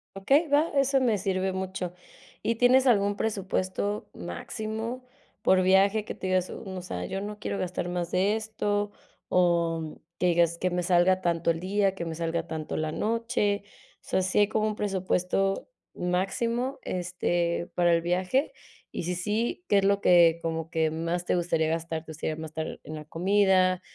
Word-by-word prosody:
Okey, 275 - +3
va, 295 +3 +3
eso 275 0 +3
me 235 -5 +2
sirve 190 -1 -1
mucho. 190 -1 -4 0.5
¿Y 230 - 0
tienes 255 +3 +5
algún 205 -3 +3
presupuesto 200 -1 -2
máximo, 220 - -5 0.4
por 185 0 +5
viaje? 195 +3 +4
Que - - -6
tu - - -26
digas: 185 -1 +1
"Mm, 190 -2 -7
o - - -4
sea, 180 - -5
yo 195 +1 -4
no 210 0 -6
quiero 200 - -3
gastar 180 -1 -3
más 175 -1 -3
de 195 +4 +2
esto". 205 -2 -2 0.4
O 170 -3 +1 0.2
que 180 - +2
digas: 170 -1 +3
"Que 185 - 0
me 180 0 0
salga 175 +1 +4
a 185 - -4
tanto 170 -1 +1
el 165 - -3
día, 195 +1 +1
que 170 -3 -5
me 165 -1 -4
salga 165 0 -1
a 165 - -20
tanto 155 -1 -4
la 155 0 -1
noche". 220 0 0 0.4
O - - -51
sea, 190 - +2
¿sí 185 +2 +1
hay 205 - +5
como 215 0 0
un 215 - -2
presupuesto 195 - 0 0.2
máximo, 230 +9 -1
este, 175 -1 -1
para 175 -1 +4
el 165 - +3
viaje? 185 - 0 0.4
Y, - - -4
si 180 +1 -2
sí, 215 - -2
¿qué 200 - +4
es - - -1
lo 200 0 +3
que 170 -2 +5
como 165 -1 -3
que 160 -2 +1
más 170 +2 -2
te - - +1
gustaría 170 -2 +1
gastar? 165 0 -2
¿Te 160 - -9
gustaría 155 0 -3
mastar 160 0 -5
en 155 +1 -7
la 150 -1 -8
comida, 185 +1 +3
185 Hz, 185 wpm, -27 LUFS, 170-205 Hz, 0.5 s, tienes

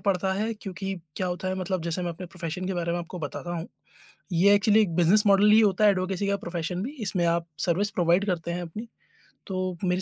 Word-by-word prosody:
पड़ता 190 -1 +1
है, 215 +3 -1
क्योंकि 195 -2 -5 0.2
क्या 185 - -1
होता 180 +1 -3
है 185 - -1
मतलब 185 -1 -2
जैसे 170 +2 -2
मैं 175 - -2
अपने 175 +2 -8
प्रोफ़ेशन 175 +1 -5
के 190 - -2
बारे 170 -1 -1
में 175 - -1
आपको 175 +1 -7
बताता 160 +2 -5
हूँ, 165 +1 -5 0.6
ये 185 +4 +5
एक्चुअली 210 +2 +4
एक 180 -6 0
बिज़नेस 180 +5 +5
मॉडल 200 +1 +6
ही 215 - +7
होता 210 -1 +3
है 205 - +7
एडवोकेसी 190 +1 -1
का 200 0 +1
प्रोफ़ेशन 175 -1 -4
भी, 255 - -4
इसमें 190 -5 0
आप 170 0 0 0.2
सर्विस 185 +4 +1
प्रोवाइड 175 +1 +2
करते 170 -3 -2
हैं 175 - -3
अपनी, 210 +8 -7 0.6
तो 185 -2 -2
मेरे 180 0 +1
185 Hz, 230 wpm, -26 LUFS, 175-200 Hz, 0.6 s, ही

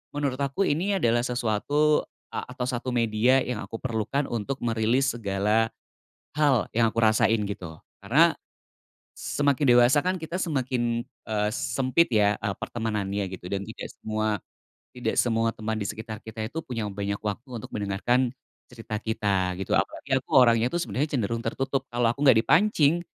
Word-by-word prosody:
menurut 140 -3 -1
aku 140 +7 0
ini 185 +7 +1
adalah 120 -5 +2
sesuatu 125 +5 +1 0.3
a - - -4
atau 125 - -3
1 125 0 -3
media 120 +3 +3
yang 125 - -3
aku 100 - -8
perlukan 130 +3 -1
untuk 120 +4 -3
merilis 120 +3 +2
segala, 105 +1 +1 0.7
hal 145 -6 +3
yang 115 0 +3
aku 110 - -12
rasain 110 0 +3
gitu 90 -5 -6 0.2
karena, - - +4 0.8
semakin 145 0 0
dewasa 120 +4 +6
kan 185 -1 0
kita 165 +3 -4
semakin, 125 -8 -1 0.2
eee, 105 -1 0
sempit 130 +7 +1
ya, 105 -1 +3
eee, 100 -2 -2
pertemanannya 105 -3 -2
gitu 90 - -9
dan 100 0 -2
tidak - - -8
semua 110 0 -2 0.6
tidak 125 -1 -2
semua 115 -1 +2
teman 110 -1 -4
di 100 - -2
sekitar 110 0 -6
kita 110 0 -6
itu 155 +9 -5
punya 115 -7 -4
banyak 100 0 -3
waktu 105 +5 -5
untuk 110 - -10
mendengarkan, 105 +5 +1 0.4
cerita 115 -3 -7
kita 100 -4 0
gitu 95 - 0
apalagi 135 -2 -1
aku 130 - -7
orangnya 115 -2 +5
itu 175 - -1
sebenarnya 145 -4 -1
cenderung 115 -2 -1
tertutup 135 +3 -1
kalau 120 -1 +2
aku 140 +4 -4
nggak 130 -5 +7
dipancing, 165 - +3
115 Hz, 160 wpm, -26 LUFS, 110-135 Hz, 0.8 s, nggak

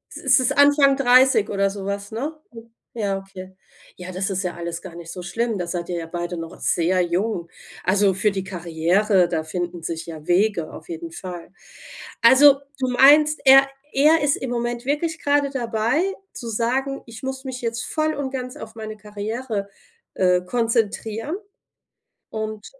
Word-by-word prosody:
ist - - +3
es 255 - +1
Anfang 285 -1 +5
30 255 -4 +5
oder 200 -1 +1
sowas, 200 +1 -5
ne? 275 +8 -3 0.6
Ja, 205 -4 -1
okay. 190 -1 -11 0.4
Ja, 180 0 -8
das 190 +3 -2
ist 190 0 -2
ja 180 -1 -3
alles 170 0 -5
gar 180 -3 -10
nicht 170 -1 -9
so 180 - -7
schlimm. 225 +5 -2
Da 175 -2 -3
seid 170 0 -4
ihr 175 - -2
ja 165 - -4
beide 175 +1 -4
noch 165 0 -8
sehr 180 +2 +1
jung. 175 0 -1 0.4
Also 195 0 +3
für 205 +3 +1
die 195 -1 -3
Karriere, 180 +2 +1
da 160 -2 -1
finden 175 +1 -4
sich 165 0 -5
ja 160 -2 -9
Wege 175 -2 +1
auf - - -11
jeden 335 -1 -6
Fall. 180 - -8 0.7
Also, 270 +4 +7 0.2
du 260 -1 0
meinst, 295 +4 +6
er 270 +1 +8 0.2
er 305 +4 +4
ist 290 - +2
im 260 - -5
Moment 240 0 -3
wirklich 320 +3 -1
gerade 285 -1 +2
dabei 235 +2 0 0.3
zu 235 - -8
sagen: 260 +5 -1
„Ich 230 +1 -11
muss 265 +1 -5
mich 255 -1 -5
jetzt 230 -1 -3
voll 310 0 -1
und 275 -2 -4
ganz 255 -1 -5
auf 220 +1 -10
meine 215 -1 -7
Karriere, 210 +1 -5 0.5
äh, 180 -1 +3
konzentrieren.“ 225 - -1 0.9
und 215 -1 -5
215 Hz, 170 wpm, -22 LUFS, 180-265 Hz, 0.9 s, er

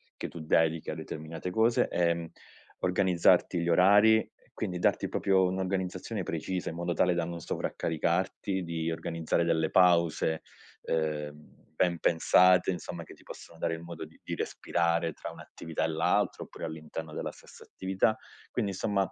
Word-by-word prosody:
che - - -5
tu 85 - -9
dedichi 80 0 +1
a - - -4
determinate 80 +3 -6
cose, 110 +5 +3
ehm, 85 -1 0 0.5
organizzarti 90 -1 +3
gli 85 0 -1
orari, 105 +5 +5 0.2
quindi 90 - -3
darti 90 - +1
proprio 95 -1 +2
un’organizzazione 95 +2 -2
precisa, 90 +2 -3
in 80 - -6
modo 85 0 -2
tale 90 +2 +2
da 85 -1 0
non 85 0 -5
sovraccaricarti, 90 +5 -1
di 85 -1 -2
organizzare 80 0 -1
delle 80 -1 +1
pause, 85 -3 +3 0.4
uhm, 75 -2 -4
ben 85 +1 +2
pensate, 90 +3 +4
insomma, 90 -2 -4
che - - -13
ti - - -21
possono 85 - -11
dare 85 0 -1
il 80 - -5
modo 85 -1 -7
di - - -19
di - - -4
respirare 85 -1 0
tra - - -7
un’attività 80 -1 -6
e - - +1
l’altra 80 +1 +1
oppure - - -8
all’interno 80 0 -7
della - - -4
stessa - - -15
attività. 95 +3 0 0.4
Quindi, 100 - -1
insomma, 100 0 -1
85 Hz, 155 wpm, -29 LUFS, 80-95 Hz, 0.5 s, orari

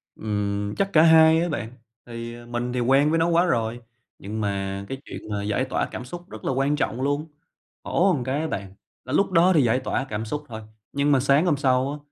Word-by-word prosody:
Ừm, 105 -1 -2
chắc 195 - +1
cả 155 - +6
hai 160 0 +6
á 175 - -1
bạn, 120 -6 -3 0.4
thì 115 0 -7
mình 120 +1 -3
thì 125 - -1
quen 135 +4 +3
với 165 +1 +2
nó 165 - +2
quá 170 +1 +3
rồi, 115 -7 -1 0.4
nhưng 110 +3 -5
mà 100 -1 -3
cái 135 - -4
chuyện - - -9
mà 100 -1 -3
giải 105 +5 0
tỏa - - -1
cảm 125 - -6
xúc 175 +6 -9
rất 110 - -10
là - - +1
quan 135 +3 +1
trọng 130 -4 -2
luôn. 145 +3 -1 0.6
Khổ 185 +2 +2
một 140 - -1
cái 135 +4 -1
á 160 - -2
bạn, 100 -6 -5 0.3
là 130 - -5
lúc 195 +5 +2
đó 175 +3 +5
thì 150 - +5
giải 120 +2 +2
tỏa - - -2
cảm 105 +1 -3
xúc 150 +7 -4
thôi, 110 -2 -7 0.3
nhưng 140 +1 +1
mà 135 - +4
sáng 140 +5 +3
hôm 160 -5 +2
sau 130 -1 +1
á, 150 - -5
130 Hz, 240 wpm, -24 LUFS, 110-150 Hz, 0.6 s, cả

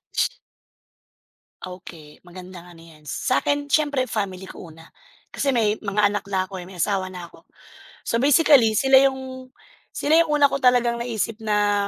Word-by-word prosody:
Sh - - 0 1.2
Okey. 170 -5 -12
Magandang 180 0 -12
ano 175 -2 -16
yan, 160 -2 -18
sa'kin 285 - -1
siyempre 285 -4 0
family 190 -3 -4
ko 165 -3 -11
una, 165 +1 -16 0.4
kasi 275 -2 -1
may 215 -3 +1
mga 205 0 0
anak 205 - -4
na 190 -1 -1
ako 190 - -8
eh, - - -10
may 185 0 -13
asawa 190 -2 -1
na 175 -1 -9
ako. - - -20 0.6
So 230 - -2
basically 280 -4 +4
sila 265 +4 +4
yung 260 -1 -4 0.4
sila 310 +3 +2
yung 330 - -10
una 285 -1 +5
ko 275 - -2
talagang 245 -2 +3
naisip 225 -2 -3
na 205 -1 +1
210 Hz, 160 wpm, -22 LUFS, 185-260 Hz, 1.2 s, una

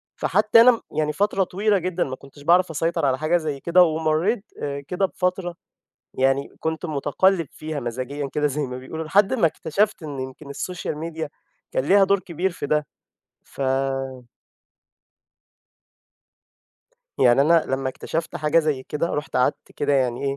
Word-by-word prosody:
فحتى 230 - +4
أنا 235 -1 +6 0.2
يعني 150 -1 +1
فترة 200 0 +1
طويلة 200 +3 +1
جدًا 180 0 -1
ما 130 -1 -5
كنتش 140 +1 -16
بعرف 175 +2 +4
أسيطر 165 0 0
على 130 -1 +2
حاجة 155 +4 +2
زي 150 -4 -3
كده 180 +3 +5
ومريت 160 +6 +1 0.2
آآ 140 -1 -3
كده 190 +2 0
بفترة 180 -1 -2 0.6
يعني 135 +1 +2
كنت 160 +2 -2
متقلب 160 +4 +1
فيها 155 -2 -5
مزاجيًا 130 +4 -4
كده 150 0 +1
زي 145 +1 -1
ما 125 0 -6
بيقولوا 160 +5 -6
لحد 195 +8 +3
ما 220 -9 +3
اكتشفت 185 +5 0
إن 145 -3 -5
يمكن 130 +2 -8
السوشيال 165 +1 -4
ميديا 160 -1 -4 0.4
كان 130 - 0
ليها 195 +4 +5
دور 200 0 +2
كبير 180 +1 -2
في 165 - -5
ده 150 0 +1 0.6
فا 135 -1 -2 3.0
يعني 125 +1 +5
أنا 165 +3 +4
لما 135 0 -1
اكتشفت 165 +5 -4
حاجة 155 +2 +2
زي 150 -5 0
كده 150 +5 -2
رُحت 150 +1 -3
قعدت 125 +3 0
كده 145 0 0
يعني 130 -1 +1
ايه، 140 0 -1
155 Hz, 155 wpm, -23 LUFS, 140-175 Hz, 3.0 s, أنا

